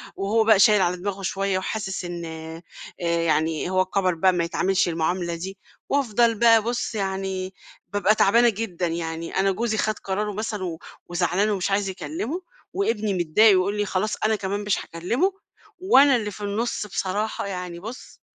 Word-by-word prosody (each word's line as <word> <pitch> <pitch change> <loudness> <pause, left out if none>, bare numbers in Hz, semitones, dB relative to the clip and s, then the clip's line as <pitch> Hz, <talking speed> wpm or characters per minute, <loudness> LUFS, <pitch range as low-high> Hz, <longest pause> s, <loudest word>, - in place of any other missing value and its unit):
وهو 210 +3 +1
بقى 220 -2 +5
شايل 210 0 +6
على 180 0 +1
دماغه 195 +2 -4
شويّة 195 0 -1
وحاسس 190 -1 -3
إن 175 -1 -5
آآ، 160 0 -8 0.6
يعني 160 0 0
هو 185 0 +2
كَبر 185 -1 +1
بقى 185 +3 +3
ما 175 -1 0
يتعاملش 185 +3 +1
المعاملة 170 +1 -1
دي، 190 +4 -7 0.3
وأفضل 235 -4 +2
بقى 230 -1 +6
بُصّ 240 +1 -3
يعني، 190 -1 -3 0.4
بابقى 205 +1 +3
تعبانة 235 +4 +5
جدًا، 195 -5 -3
يعني 165 0 -4
أنا 195 0 +3
جوزي 220 +2 -1
خد 215 0 -1
قرارُه 205 +2 -2
مثلًا 210 -1 -4
و 165 -3 -4 0.3
وزعلان 180 +4 +1
ومش 200 -1 -1
عايز 195 0 +1
يكلِّمه، 305 - -4 0.3
وابني 220 - 0
متضايق 185 +5 +4
ويقول 200 +3 0
لي 205 - 0
خلاص 195 +3 -1
أنا 220 0 +3
كمان 200 0 -3
مش 205 -1 0
هاكلِّمه، 235 - -1 0.5
وأنا 285 - +6
اللي 210 -3 -2
في 205 - -11
النُصّ 210 +2 -2
بصراحة 200 +2 -2
يعني 180 -3 -5
بُصّ، 225 +7 -10
195 Hz, 165 wpm, -24 LUFS, 180-215 Hz, 0.6 s, شايل